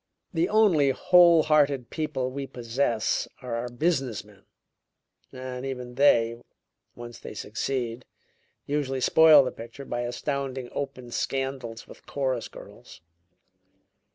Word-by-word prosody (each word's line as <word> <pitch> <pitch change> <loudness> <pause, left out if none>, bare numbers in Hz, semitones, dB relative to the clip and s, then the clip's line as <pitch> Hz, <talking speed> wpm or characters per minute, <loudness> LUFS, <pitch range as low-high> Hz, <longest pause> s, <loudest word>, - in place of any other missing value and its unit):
The 170 +2 +1
only 190 -10 +4
whole 170 +3 +5
hearted 145 -5 +2
people 145 -5 -2
we 135 +1 -5
possess 120 -2 -1 0.2
are 125 -2 -5
our 120 +1 -3
business 130 - -1
men, 100 -2 -20 0.9
and 130 0 -7
even 125 -2 -5
they, 120 -3 +3 0.5
once 120 -1 -10
they - - -9
succeed, 120 +2 -3 0.6
usually 140 -2 -2
spoil 155 0 +7
the 125 - -3
picture 120 +4 -10
by 120 -2 -3
astounding 130 +1 -3
open 130 -3 -6
scandals 130 -4 -3
with - - -15
chorus 130 -4 -2
girls." - - -14
130 Hz, 120 wpm, -26 LUFS, 120-140 Hz, 0.9 s, spoil